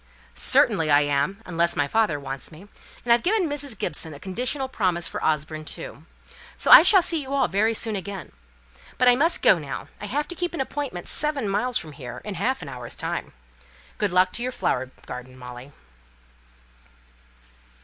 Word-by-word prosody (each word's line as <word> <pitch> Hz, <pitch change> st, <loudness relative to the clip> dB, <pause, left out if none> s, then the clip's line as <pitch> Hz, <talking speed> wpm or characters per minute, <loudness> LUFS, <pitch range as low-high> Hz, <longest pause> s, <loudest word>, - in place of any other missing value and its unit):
"Certainly, 160 Hz, -2 st, +3 dB
I 145 Hz, 0 st, +6 dB
am, 145 Hz, +9 st, -1 dB
unless 170 Hz, -1 st, 0 dB
my 145 Hz, -, +1 dB
father 210 Hz, -6 st, +1 dB
wants 135 Hz, +1 st, -6 dB
me; 170 Hz, +6 st, -13 dB, 0.4 s
and 235 Hz, -, +5 dB
I've 235 Hz, -, +3 dB
given 390 Hz, -, +1 dB
Mrs. 285 Hz, -6 st, -4 dB
Gibson 160 Hz, -5 st, -3 dB
a -, -, -11 dB
conditional 250 Hz, -, -2 dB
promise 180 Hz, -9 st, 0 dB
for -, -, -5 dB
Osborne, 155 Hz, 0 st, -1 dB
too. -, -, -8 dB, 0.5 s
So -, -, 0 dB
I -, -, +13 dB
shall 385 Hz, -5 st, +6 dB
see 330 Hz, -3 st, 0 dB
you 275 Hz, 0 st, -4 dB
all 265 Hz, -3 st, +3 dB
very 220 Hz, +3 st, +1 dB
soon 220 Hz, 0 st, -3 dB
again. 195 Hz, 0 st, -6 dB, 0.7 s
But 250 Hz, -, +3 dB
I 245 Hz, -, +7 dB
must 325 Hz, +7 st, +1 dB
go -, -, +6 dB
now. -, -, -6 dB
I -, -, -5 dB
have 295 Hz, +1 st, -1 dB
to 350 Hz, -, -6 dB
keep 350 Hz, 0 st, -3 dB
an -, -, -5 dB
appointment 265 Hz, -8 st, -4 dB
seven 290 Hz, -6 st, 0 dB
miles 220 Hz, +5 st, 0 dB
from 155 Hz, -, -6 dB
here 130 Hz, -4 st, -8 dB
in 210 Hz, -, -4 dB
half 200 Hz, +4 st, -1 dB
an -, -, -8 dB
hour's 125 Hz, -3 st, -8 dB
time. -, -, -4 dB, 0.7 s
Good 205 Hz, -3 st, 0 dB
luck 185 Hz, +1 st, +3 dB
to -, -, -2 dB
your 250 Hz, +1 st, -1 dB
flower 130 Hz, -, -1 dB, 0.2 s
garden, 130 Hz, +1 st, -9 dB
Molly." 125 Hz, +2 st, -10 dB
200 Hz, 185 wpm, -24 LUFS, -, 0.7 s, I